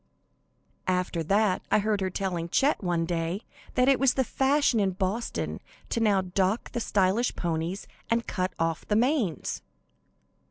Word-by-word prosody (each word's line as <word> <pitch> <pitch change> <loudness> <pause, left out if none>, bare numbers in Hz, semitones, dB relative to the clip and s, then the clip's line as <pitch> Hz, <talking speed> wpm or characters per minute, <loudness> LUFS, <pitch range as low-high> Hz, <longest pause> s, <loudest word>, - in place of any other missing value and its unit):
After 180 -2 0
that 195 +3 +2
I - - +4
heard 210 -1 0
her 190 - 0
telling 180 -3 -3
Chet 275 - +2
one 175 -2 0
day 170 +3 -2 0.3
that 250 0 +3
it 270 -1 +4
was 270 -1 +3
the 265 - +2
fashion 270 -1 +2
in 195 -2 +1
Boston 195 +5 -2 0.4
now 210 -4 +3
to 185 - -8
dock 190 +4 0
the - - -2
stylish 205 +2 +1
ponies 170 +3 -2 0.2
and 230 0 +1
cut 185 -1 -2
off 165 -1 -1
the 210 - +1
manes. 235 - 0
195 Hz, 155 wpm, -27 LUFS, 180-230 Hz, 0.4 s, I